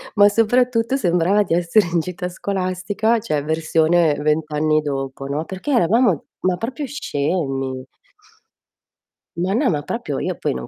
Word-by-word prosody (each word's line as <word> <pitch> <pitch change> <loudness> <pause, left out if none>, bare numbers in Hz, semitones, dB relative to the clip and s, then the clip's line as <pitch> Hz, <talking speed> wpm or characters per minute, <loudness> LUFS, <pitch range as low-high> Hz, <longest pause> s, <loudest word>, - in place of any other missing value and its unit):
ma 205 -1 +6
soprattutto 230 +3 +2
sembrava 180 -1 +2
di 165 - -2
essere 175 +4 +2
in 170 - +2
gita 180 +2 -4
scolastica, 195 +4 -1
cioè, 155 -10 -2
versione 160 +1 +2
20 150 +2 +1
anni 155 +1 +2
dopo, 135 -2 -4
no, 145 +3 -3
perché 190 - -5
eravamo 230 - +3 0.2
ma 185 -1 +1
proprio 260 - -4
scemi. 140 - -2 1.5
Ma 180 +3 0
no, 260 +6 +2
ma 150 -3 -1
proprio 235 +10 -4
io - - -2
poi - - -1
non - - -6
180 Hz, 145 wpm, -20 LUFS, 155-215 Hz, 1.5 s, ma